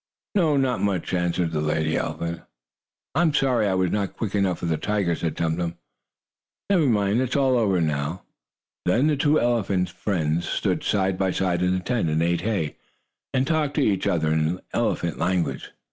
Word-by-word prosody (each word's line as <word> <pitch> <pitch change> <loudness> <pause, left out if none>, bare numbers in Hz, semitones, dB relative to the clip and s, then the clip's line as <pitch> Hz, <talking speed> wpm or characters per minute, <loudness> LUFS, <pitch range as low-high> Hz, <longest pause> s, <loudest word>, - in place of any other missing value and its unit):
"No, 165 -8 +3
not 130 -2 +1
much," 100 -3 -1
answered 90 -1 0
the 75 -2 -1
lady 80 0 0
elephant. 85 0 -3 0.7
"I'm 165 -3 +2
sorry 125 -7 +2
I 95 - +1
was 95 -1 +1
not 100 -2 -2
quick 105 -4 -3
enough 100 -3 +1
for - - -5
the 85 -1 +1
tiger," 100 +1 0
said 80 -1 -3
Tum 80 -1 0
Tum. 85 -1 -2 1.0
"Never 170 -7 +4
mind, 105 0 +2
it 130 - -1
is 130 - -3
all 135 -2 +3
over 100 -6 +2
now." 75 +2 -1 0.6
Then 115 +10 +3
the 155 -1 +3
two 145 +2 +3
elephant 100 -6 +1
friends 85 -4 -1
stood - - -1
side 95 -2 0
by 95 -1 +2
side 90 -1 0
in 90 0 +2
the - - 0
tent 115 -5 0
and 80 +1 +1
ate 85 0 +1
hay 100 -9 -2 0.5
and 130 0 +1
talked 155 -2 0
to 150 - +2
each 100 -1 +1
other 80 -5 +1
in 80 +3 0
elephant 105 -7 -1
language. 90 0 -1
95 Hz, 190 wpm, -24 LUFS, 85-120 Hz, 1.0 s, Never